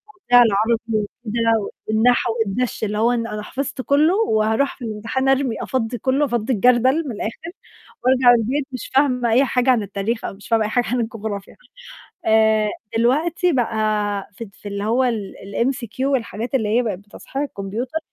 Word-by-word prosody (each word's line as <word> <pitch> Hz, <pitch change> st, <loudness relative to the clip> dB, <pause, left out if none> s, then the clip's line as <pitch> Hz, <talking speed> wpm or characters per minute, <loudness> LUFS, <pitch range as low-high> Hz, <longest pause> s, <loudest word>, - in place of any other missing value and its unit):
وبتاع 245 Hz, -10 st, +5 dB
العربي 220 Hz, +1 st, +2 dB
وكده 225 Hz, 0 st, -1 dB, 0.2 s
والنحو 230 Hz, +2 st, +2 dB
والدَش، 225 Hz, +4 st, -2 dB
اللي 210 Hz, 0 st, -1 dB
هو 230 Hz, +3 st, +3 dB
أنا 230 Hz, -3 st, -2 dB
حفظت 275 Hz, +3 st, -4 dB
كُلّه 295 Hz, +6 st, +3 dB
وهاروح 220 Hz, -, +1 dB
في 250 Hz, -, -7 dB
الامتحان 230 Hz, +5 st, -2 dB
أرمي، 270 Hz, -3 st, +2 dB
أفضي 245 Hz, -2 st, -2 dB
كُلّه، 265 Hz, +6 st, +1 dB
أفضّي 240 Hz, -1 st, -1 dB
الجردَل 250 Hz, +7 st, +3 dB
من -, -, -3 dB
الآخِر، 230 Hz, +11 st, -5 dB, 0.5 s
وأرجع 255 Hz, -1 st, +5 dB
البيت 265 Hz, +5 st, -1 dB
مش 255 Hz, -3 st, -6 dB
فاهمة 255 Hz, -4 st, +2 dB
أي 250 Hz, +5 st, +4 dB
حاجة 250 Hz, 0 st, +1 dB
عن 240 Hz, -4 st, +3 dB
التاريخ 205 Hz, +3 st, -3 dB
أو -, -, -4 dB
مش 195 Hz, +1 st, -14 dB
فاهمة 225 Hz, -1 st, +2 dB
أي -, -, -1 dB
حاجة 245 Hz, +2 st, +1 dB
عن 250 Hz, 0 st, 0 dB
الجغرافيا. 220 Hz, -4 st, -5 dB, 0.7 s
آآ 220 Hz, -1 st, +4 dB, 0.3 s
دلوقتي 320 Hz, +9 st, +2 dB
بقى 240 Hz, -5 st, 0 dB, 0.6 s
في 230 Hz, -, -8 dB
ت 200 Hz, -2 st, -16 dB
في 205 Hz, -, -9 dB
اللي 200 Hz, 0 st, -4 dB
هو 235 Hz, +4 st, +2 dB
ال 220 Hz, -6 st, -2 dB, 0.2 s
الMCQ 245 Hz, -2 st, -2 dB
والحاجات 245 Hz, -3 st, -2 dB
اللي 220 Hz, -5 st, +1 dB
هي -, -, +3 dB
بقت 210 Hz, -6 st, -3 dB
بتصحيح 205 Hz, +7 st, -7 dB
الكمبيوتر، 240 Hz, +3 st, -4 dB
235 Hz, 170 wpm, -21 LUFS, 215-260 Hz, 0.7 s, وبتاع